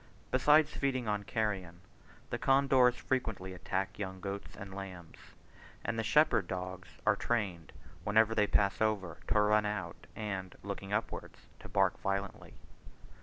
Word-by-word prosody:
Besides 150 +1 +5
feeding 130 -4 -1
on 105 -1 0
carrion, 95 -7 -2 0.5
the - - -2
condors 135 -2 +5
frequently 110 -8 -2
attack 95 +2 -3
young 95 -2 -4
goats 100 +1 -6
and 95 -1 -8
lambs; 95 -4 -9 0.5
and 115 0 -1
the - - +1
shepherd 115 - +4
dogs 95 0 -5 0.2
are 110 -1 +5
trained, 100 -8 -2 0.3
whenever 110 +1 +4
they 105 -2 +3
pass 100 0 +2
over, 100 -6 0
to 105 - +3
run 105 0 +4
out, 95 -5 -5
and 95 -4 -4
looking 100 0 -5
upwards 110 +2 -3
to - - -11
bark - - +2
violently. 100 0 -3
100 Hz, 140 wpm, -33 LUFS, 95-110 Hz, 0.5 s, Besides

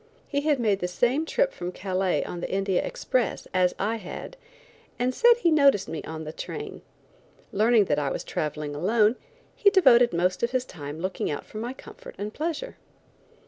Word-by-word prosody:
He 285 -1 -1
had 295 -2 +1
made 210 -4 +2
the 180 - -1
same 250 - +1
trip - - +1
from 175 - -5
Calais 185 0 -1
on 175 - -6
the - - -4
India 195 -1 0
express 250 -2 -1
as 180 -1 +2
I 220 +3 -1
had, 215 - -8 0.6
and 250 +1 0
said 475 - +5
he 340 - +3
noticed 280 -10 +4
me 160 - -5
on 160 0 -6
the 155 0 -7
train. - - -7 0.7
Learning 220 +1 +4
that 150 -4 +1
I 140 -2 0
was - - -3
traveling 150 -1 -3
alone, 210 +8 +3 0.4
he 405 - +5
devoted 255 - +6
most 180 +2 0
of 235 - +1
his 255 0 -1
time 150 - -8
looking 185 +1 -2
out 145 - -4
for 215 - -8
my 240 +3 -4
comfort - - -12
and 210 +1 -5
pleasure. 335 +11 -4
215 Hz, 185 wpm, -26 LUFS, 180-265 Hz, 0.7 s, devoted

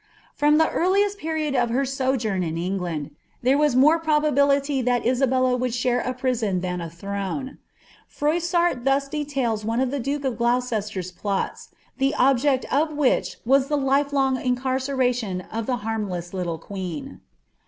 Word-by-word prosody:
From 295 +1 +3
the 320 0 +4
earliest 400 +3 +1
period 315 -2 -2
of 245 -3 +1
her 265 +4 +1
sojourn 255 -7 -1
in 165 -2 -2
England, 170 -4 -3 0.3
there 260 +3 +4
ww 295 -3 +2
matt 305 +6 +5
probability 285 -3 +2
that 245 0 0
Isabella 255 0 +2
would 250 -1 -1
share 245 0 +1
a 250 - -2
prison 245 -7 -1
than 180 -1 -3
a 170 - -5
throne. 200 - -5 0.6
PnMMn 340 -2 +1
thus 275 +1 +2
details 275 -7 -2
one 225 +2 -1
of 260 -1 +1
the 285 - -2
duke 280 +3 -2
of 250 -3 -2
Gloucester's 220 -6 -1
plots, 195 +2 -3 0.3
the 270 +1 +2
objeci 265 +1 +3
ol 295 +4 +3
windi 295 -3 0
was 270 +2 +4
the 295 0 0
lifelong 275 -1 +1
incarceration 250 -5 0
of 225 0 -3
the 255 - +1
harmless 195 -6 -3
little 175 -3 -2
qneeo. 180 -4 -6
255 Hz, 155 wpm, -24 LUFS, 215-280 Hz, 0.6 s, matt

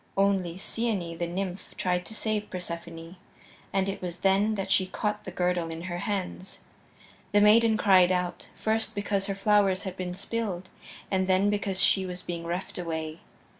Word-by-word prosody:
Only 195 -3 +2
Cyane, 190 -5 -2
the 170 - 0
nymph, 185 +1 -4
tried 180 -1 0
to 220 - -8
save 215 -1 -1
Persephone, 170 -1 -7 0.5
and 195 0 +1
it 195 - -3
was 175 -1 -5
then 200 +3 +3
that 195 -1 -3
she 190 -2 +3
caught 210 +2 -2
the 185 - -5
girdle 180 -2 0
in 165 +1 -6
her 175 -1 -4
hands. 190 -1 -4 0.7
The 205 - +6
maiden 220 +2 +6
cried 185 -4 +6
out, 180 -1 -2
first 220 0 0
because 200 -1 -1
her 195 - -1
flowers 195 -1 +3
had 190 -3 -5
been 180 -1 -4
spilled, 195 -3 -3 0.4
and 190 -1 +2
then 190 +2 +3
because 200 -2 -1
she 190 -1 +4
was 180 0 -6
being 170 -1 -5
reft 180 +2 -4
away. 160 -2 -4
190 Hz, 170 wpm, -28 LUFS, 180-205 Hz, 0.7 s, The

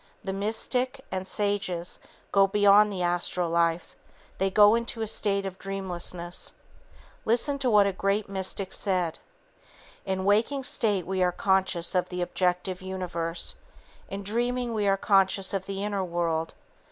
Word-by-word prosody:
The 190 - -3
mystic, 250 +6 -1
and 185 0 -3
sages, 195 -4 -1 0.3
go 195 0 +5
beyond 205 +1 +5
the 185 -2 -2
astral 175 0 0
life. 170 0 +1 0.4
They 195 - +2
go 205 +2 +6
into 235 -1 -1
a - - -3
state 200 -2 0
of 190 0 -6
dreamlessness. 180 -3 -4 0.7
Listen 260 +5 +1
to 260 -2 +1
what 210 -3 +6
a 200 - 0
great 195 +2 0
mystic 190 0 -3
said: 180 -5 -1 0.8
"In 190 -1 -2
waking 225 +7 +2
state 205 -7 +1
we 190 0 -1
are 180 0 +3
conscious 190 -2 +1
of 180 -1 +1
the 180 -1 -2
objective 180 +1 -1
universe. 180 -3 -3 0.6
In 200 +1 -5
dreaming 240 +3 -1
we 210 -2 0
are 195 0 +3
conscious 195 -1 +2
of 190 -1 -2
the 195 0 -3
inner 205 -2 -1
world. 170 -2 -1
195 Hz, 150 wpm, -27 LUFS, 180-205 Hz, 0.8 s, go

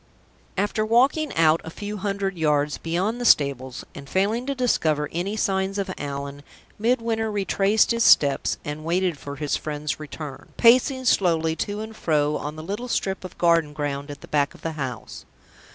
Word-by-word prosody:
After 205 +2 0
walking 265 +8 +3
out 160 0 +4
a - - -7
few 205 +5 -6
hundred 195 -1 -2
yards 150 -3 +1
beyond 190 +9 -1
the - - -1
stables, 135 - +2
and 140 -1 -10
failing 215 +7 0
to 275 - -1
discover 155 - +1
any 190 +6 -2
signs 195 -1 0
of 195 -1 -2
Allan, 140 0 -5 0.4
Midwinter 230 -1 0
retraced 200 +2 +2
his 230 0 +2
steps, 140 -2 +4
and 150 +1 -5
waited 175 +1 0
for 140 0 -7
his 145 0 -1
friend's 150 0 -3
return, 150 -2 -8
pacing 255 +2 +4
slowly 165 -7 +2
to 205 +1 -3
and 220 0 -7
fro 150 -5 +1
on 150 +1 -5
the 155 - -8
little 205 +8 -4
strip 195 -5 -2
of 185 - -9
garden 165 -3 +3
ground 145 -1 -3
at 145 -1 -8
the - - -11
back 145 -1 0
of - - -18
the 165 - -2
house. 135 -6 -6
170 Hz, 175 wpm, -24 LUFS, 150-210 Hz, 0.4 s, out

